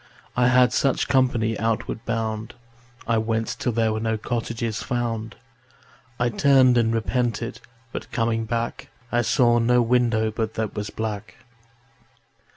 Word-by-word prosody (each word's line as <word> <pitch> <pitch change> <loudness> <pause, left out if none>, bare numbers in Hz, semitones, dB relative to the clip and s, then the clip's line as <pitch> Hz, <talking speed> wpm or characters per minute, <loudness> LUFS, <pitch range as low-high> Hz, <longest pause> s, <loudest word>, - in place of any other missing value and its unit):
I 125 0 +3
had 125 0 +4
such 135 -2 +1
company 120 -4 +1
outward 110 0 -2
bound. 110 -1 -3 0.5
I 115 -1 +2
went 110 0 -1
till 125 - 0
there 110 -1 +1
were 110 - -2
no 110 0 -1
cottages 115 0 -3
found. 115 -3 -3 0.8
I 120 0 +2
turned 130 +1 +4
and 115 -2 +3
repented, 115 0 -1 0.3
but - - -7
coming 115 0 0
back 115 +1 -3 0.2
I 120 - +2
saw 120 -1 +3
no 125 +1 +3
window 115 -2 +2
but 110 0 -3
that 110 -2 -2
was 105 0 -4
black. 110 -1 -5
115 Hz, 140 wpm, -24 LUFS, 110-120 Hz, 0.8 s, had